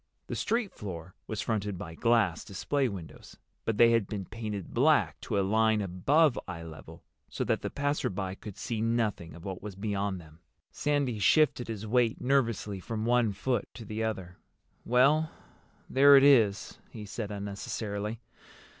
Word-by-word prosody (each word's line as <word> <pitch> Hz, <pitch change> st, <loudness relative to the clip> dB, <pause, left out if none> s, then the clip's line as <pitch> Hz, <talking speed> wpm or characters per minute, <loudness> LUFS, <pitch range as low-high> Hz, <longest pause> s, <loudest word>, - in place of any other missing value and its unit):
The -, -, -5 dB
street 230 Hz, -3 st, -1 dB
floor 90 Hz, -3 st, -7 dB
was 110 Hz, -, -3 dB
fronted 105 Hz, -3 st, -2 dB
by 85 Hz, -1 st, -7 dB
glass 110 Hz, -4 st, +2 dB
display 130 Hz, +6 st, -1 dB
windows, 95 Hz, -6 st, -10 dB, 0.3 s
but 115 Hz, -2 st, -1 dB
they 115 Hz, +1 st, +7 dB
had 115 Hz, -4 st, +2 dB
been 100 Hz, -3 st, -4 dB
painted 105 Hz, -1 st, -6 dB
black -, -, +3 dB
to -, -, -2 dB
a 95 Hz, -, +1 dB
line 110 Hz, +2 st, +3 dB
above 120 Hz, -, +2 dB
eye 85 Hz, -3 st, -6 dB
level, 80 Hz, -2 st, -11 dB, 0.3 s
so -, -, -3 dB
that -, -, 0 dB
the -, -, -3 dB
passer 145 Hz, +1 st, -1 dB
by 95 Hz, -1 st, -3 dB
could 100 Hz, 0 st, -10 dB
see 115 Hz, -2 st, -3 dB
nothing 110 Hz, -8 st, -1 dB
of 85 Hz, -, -12 dB
what 95 Hz, -2 st, -5 dB
was 105 Hz, -2 st, -7 dB
beyond 100 Hz, -1 st, -2 dB
them. 80 Hz, -1 st, -16 dB, 0.3 s
Sandy 140 Hz, -6 st, 0 dB
shifted 130 Hz, -, +3 dB
his 110 Hz, -2 st, -5 dB
weight 115 Hz, 0 st, +2 dB
nervously 115 Hz, -7 st, 0 dB
from 110 Hz, +3 st, -4 dB
one 120 Hz, -2 st, +3 dB
foot 120 Hz, +6 st, -2 dB
to 115 Hz, -, -9 dB
the 110 Hz, +2 st, -3 dB
other. 95 Hz, -5 st, -4 dB, 0.5 s
"Well, 140 Hz, +6 st, +4 dB, 0.6 s
there 140 Hz, +1 st, +7 dB
it 135 Hz, -, +6 dB
is," 115 Hz, -8 st, +4 dB
he 105 Hz, -2 st, -8 dB
said 105 Hz, +1 st, -5 dB
unnecessarily. 100 Hz, +2 st, -4 dB
110 Hz, 165 wpm, -29 LUFS, 100-120 Hz, 0.6 s, they